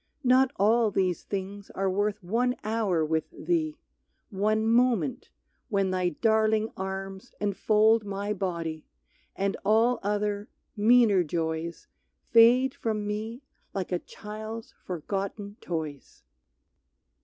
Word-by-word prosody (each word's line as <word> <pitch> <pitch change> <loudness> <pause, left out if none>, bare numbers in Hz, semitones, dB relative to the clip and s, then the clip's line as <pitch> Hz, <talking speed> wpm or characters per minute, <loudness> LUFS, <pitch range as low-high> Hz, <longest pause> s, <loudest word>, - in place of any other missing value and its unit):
Not 260 +1 +5
all 220 +3 +3
these 185 -3 0
things 200 0 -5
are 195 0 0
worth 205 +1 0
one 245 +7 +1
hour 210 -7 +1
with 160 0 -1
thee, 330 -3 -1 0.5
One 215 +2 +1
moment, 245 +2 +2 0.4
when 195 -4 +1
thy 185 -1 +1
daring 220 +4 +2
arms 190 +3 -6
enfold 215 +2 +3
My 200 +1 -3
body, 170 -5 -3 0.5
and 195 0 -1
all 225 +4 +3
other, 205 +1 -1 0.3
meaner 215 -3 +5
joys, 160 +1 -3 0.5
Fade 245 +3 +6
from 215 -2 -2
me 220 +5 -4 0.3
like 190 -2 -3
a 180 - +1
child's 215 +3 -8
forgotten 200 +4 -4
toys. 155 -5 -6
205 Hz, 110 wpm, -27 LUFS, 190-225 Hz, 0.5 s, Fade